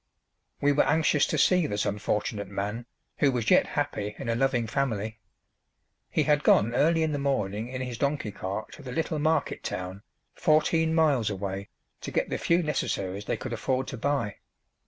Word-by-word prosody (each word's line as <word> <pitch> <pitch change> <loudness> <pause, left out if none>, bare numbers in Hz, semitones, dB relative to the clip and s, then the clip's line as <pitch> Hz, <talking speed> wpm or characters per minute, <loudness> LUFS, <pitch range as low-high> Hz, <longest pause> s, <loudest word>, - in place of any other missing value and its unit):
We 145 - +4
were 145 - +4
anxious 150 0 +3
to 155 - -1
see 180 +2 +4
this 105 0 -1
unfortunate 105 0 -2
man, 105 +4 -4 0.3
who 140 - +4
was 120 -3 0
yet - - +5
happy 105 0 -2
in - - -5
a - - +2
loving 120 -2 +1
family. 110 -3 -2 0.9
He - - +1
had 150 -1 +2
gone 115 +3 +4
early 160 +5 +3
in 160 - 0
the 145 - -1
morning 110 -6 -1
in 130 +1 -5
his 125 -3 -5
donkey 140 -6 0
cart 100 +2 -5
to - - -11
the 130 -3 -7
little 155 +3 -1
market 155 0 0
town, 90 +2 -5 0.3
fourteen 160 0 +2
miles 145 -9 +3
away, 100 0 -4 0.3
to - - -5
get - - -1
the - - -1
few 170 +1 +2
necessaries 100 - -2
they - - -1
could 130 - -5
afford 130 +3 -1
to 130 - -6
buy. 135 -4 -1
125 Hz, 180 wpm, -27 LUFS, 105-150 Hz, 0.9 s, yet